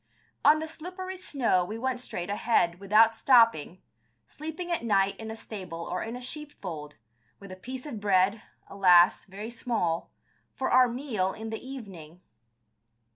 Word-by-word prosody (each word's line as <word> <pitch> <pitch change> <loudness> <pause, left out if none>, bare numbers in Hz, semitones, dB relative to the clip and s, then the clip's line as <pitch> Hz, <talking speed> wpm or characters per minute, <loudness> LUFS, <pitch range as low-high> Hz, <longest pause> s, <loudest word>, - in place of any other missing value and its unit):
On 300 +1 +7
the 315 +1 -4
slippery 365 +4 -7
snow 265 - 0
we 215 +5 -5
went 255 +1 -2
straight 180 -6 -5
ahead, 205 -5 +1
without 215 +3 +5
stopping, 230 - +3 0.4
sleeping 320 - -7
at 340 - -1
night 200 -3 +2
in 220 0 -7
a 220 - -5
stable 185 -7 -7
or 180 - -3
in 225 +2 -5
a 250 - -7
sheepfold, 190 - -7 0.4
with 200 -1 -11
a - - -7
piece 255 +8 -8
of 260 -8 -6
bread, 200 +1 +2 0.3
alas, 180 -3 +5
very 205 +4 -7
small, 220 -9 -2 0.4
for 265 - -2
our 255 0 +6
meal 235 -7 -2
in 220 0 -7
the 220 - -6
evening. 190 - -9
220 Hz, 155 wpm, -28 LUFS, 185-260 Hz, 0.4 s, On